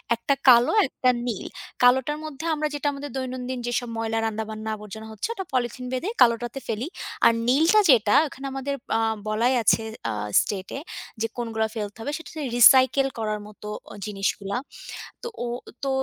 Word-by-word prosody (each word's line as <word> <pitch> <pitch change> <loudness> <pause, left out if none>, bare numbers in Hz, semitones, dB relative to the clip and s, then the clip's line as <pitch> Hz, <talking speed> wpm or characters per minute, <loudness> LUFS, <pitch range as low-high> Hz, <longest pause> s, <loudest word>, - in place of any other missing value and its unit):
১ 230 - -23
টা 280 - +5
কালো, 240 0 +7 0.2
১ - - -27
টা 255 - +6 0.2
নীল। 220 -6 -3 0.4
কালোটার 265 +4 +4
মধ্যে 310 +1 -7
আমরা 305 0 -1
যেটা 290 0 -2
আমাদের 285 +1 -6
দৈনন্দিন 255 -1 -4
যেসব 240 0 -1
ময়লা, 225 0 -1
রান্ধাবান্না 220 0 -4
আবর্জনা 215 +1 -9
হচ্ছে 220 - -3
ওটা 385 -4 -5
পলিথিন 250 0 -1
বেঁধে 300 +11 -2
কালোটাতে 240 +2 +3
ফেলি। 230 +6 -2 0.4
আর - - +8 0.2
নীলটা 320 +11 +5
যেটা 220 -5 +5
এখানে 275 0 -10
আমাদের 270 +1 -3 0.2
আ - - +1 0.3
বলাই 230 +4 +2
আছে 225 - +4 0.3
আ - - -2 0.3
স্টেটে 195 +4 -4 0.4
যে 225 - +1
কোনগুলা 225 -2 -1
ফেলতে 210 0 -5
হবে। 285 - -3
সেটা 325 - -11
হচ্ছে 310 -2 -5 0.2
রিসাইকেল 260 +3 +7
করার 215 -1 -1
মতো 210 0 -11 0.2
অ - - -9
জিনিসগুলা। 200 +1 -2 0.7
তো - - -3 0.2
ও - - -3 0.4
তো - - 0
240 Hz, 170 wpm, -25 LUFS, 220-270 Hz, 0.7 s, আর